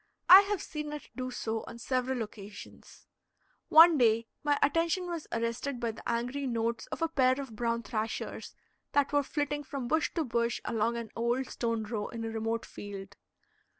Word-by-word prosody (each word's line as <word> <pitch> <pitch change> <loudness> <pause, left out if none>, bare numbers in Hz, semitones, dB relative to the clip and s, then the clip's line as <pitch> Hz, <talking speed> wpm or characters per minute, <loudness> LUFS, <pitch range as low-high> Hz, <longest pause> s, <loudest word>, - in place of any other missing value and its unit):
I 370 +2 +11
have 415 -4 -1
seen 300 -1 -5
it 300 - -8
do 255 0 -3
so 225 -3 -3
on 235 - -8
several 255 0 -1
occasions. 210 -1 -12 0.6
One 325 -1 +8
day 230 -1 +4 0.2
my 290 -1 +2
attention 330 +5 +2
was 340 -3 -5
arrested 235 +3 -2
by 235 -1 -1
the 220 - -8
angry 250 +4 -1
notes 230 -1 -1
of - - -4
a - - +3
pair 260 -4 +2
of 265 -6 -7
brown 235 0 -1
thrashers 220 -2 -4 0.4
that 285 0 +2
were 290 - +4
flitting 290 +1 -2
from 265 -2 -5
bush 310 +2 +1
to 330 - +1
bush 235 -2 0
along 230 +1 0
an 230 -2 -6
old 235 +3 0
stone 230 -2 -1
row 210 -1 -3
in 230 -1 -5
a 225 - -3
remote 225 +1 -2
field. 200 -1 -9
240 Hz, 180 wpm, -30 LUFS, 230-290 Hz, 0.6 s, I